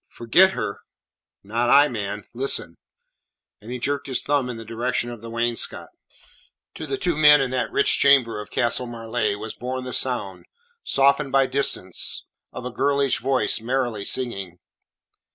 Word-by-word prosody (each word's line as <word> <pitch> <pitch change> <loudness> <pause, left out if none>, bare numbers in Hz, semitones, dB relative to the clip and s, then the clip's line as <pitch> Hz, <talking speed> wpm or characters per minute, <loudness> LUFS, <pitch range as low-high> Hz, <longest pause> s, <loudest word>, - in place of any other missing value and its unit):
"Forget 180 +12 +4
her? 100 - -4 0.6
Not 115 +4 -1
I, 145 +1 +7
man. 105 -4 -5
Listen." 120 -9 -2 0.8
And 110 +3 -10
he 125 - -3
jerked 140 +3 -3
his 130 -3 0
thumb 140 -3 0
in 120 - -5
the 115 - -9
direction 120 +2 -2
of 120 -3 -10
the 115 - -9
wainscot. 115 - -2 0.8
To - - -7
the 405 - -2
two 175 - 0
men 150 -1 +7
in 135 -2 -1
that 130 -1 -2
rich 140 - +2
chamber 130 -6 +4
of 105 - -11
Castle 120 0 0
Marleigh 115 -2 -2
was 110 +1 -7
borne 130 +1 -5
the 125 - -6
sound 105 -8 -1 0.4
softened 140 +1 +2
by 135 0 +4
distance 130 -9 0 0.3
of 125 - -8
a 125 - -4
girlish 140 +1 +1
voice 125 -4 0
merrily 120 -3 -2
singing. 100 -8 -1
125 Hz, 160 wpm, -23 LUFS, 115-135 Hz, 0.8 s, I